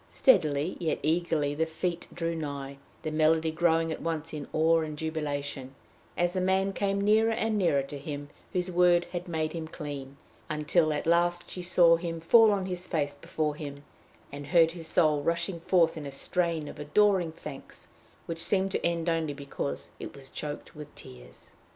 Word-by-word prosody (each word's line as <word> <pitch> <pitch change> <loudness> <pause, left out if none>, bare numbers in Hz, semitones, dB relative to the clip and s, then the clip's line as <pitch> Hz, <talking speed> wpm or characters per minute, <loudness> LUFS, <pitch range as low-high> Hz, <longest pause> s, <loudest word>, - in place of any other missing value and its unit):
Steadily 155 - +3
yet 165 -3 0
eagerly 155 -2 +1
the 160 +2 0
feet 170 +2 -3
drew 170 -1 -2
nigh, 140 -3 -5 0.2
the 155 - -2
melody 160 +1 +3
growing 165 0 +2
at - - -5
once 165 -1 -3
in 150 -2 -5
awe 165 +1 +3
and 155 -2 -4
jubilation, 145 -4 -4 0.4
as 175 0 +1
the 185 - 0
man 190 +1 +1
came 195 0 0
nearer 215 +2 +4
and 225 -1 0
nearer 170 -9 +2
to 140 +1 -7
him 145 0 -6 0.2
whose 180 0 -1
word 175 0 +4
had 175 0 -4
made 160 -2 -2
him 165 -2 -5
clean, 145 -4 -7 0.3
until 155 +1 +2
at 150 - -2
last 175 +1 +2
she 180 - -4
saw 175 -1 +5
him 165 -1 -4
fall 220 +6 +6
on 195 -2 0
his 180 -1 -3
face 145 -4 -1
before 150 +1 -2
him, 145 -2 -8 0.5
and 140 0 -7
heard 165 -1 +5
his 165 -2 -7
soul 155 -3 +3
rushing 170 +3 -1
forth 170 -1 +3
in 150 -3 -6
a - - -6
strain 165 +2 -1
of 150 - -9
adoring 180 +3 +3
thanks, 160 - -10 0.4
which 165 0 -4
seemed 195 -1 +1
to - - -2
end 170 0 0
only 165 -3 0
because 140 - -5
it - - -7
was 135 -1 -9
choked 145 -1 -6
in 150 -1 -8
tears. - - -13
165 Hz, 180 wpm, -28 LUFS, 150-175 Hz, 0.5 s, fall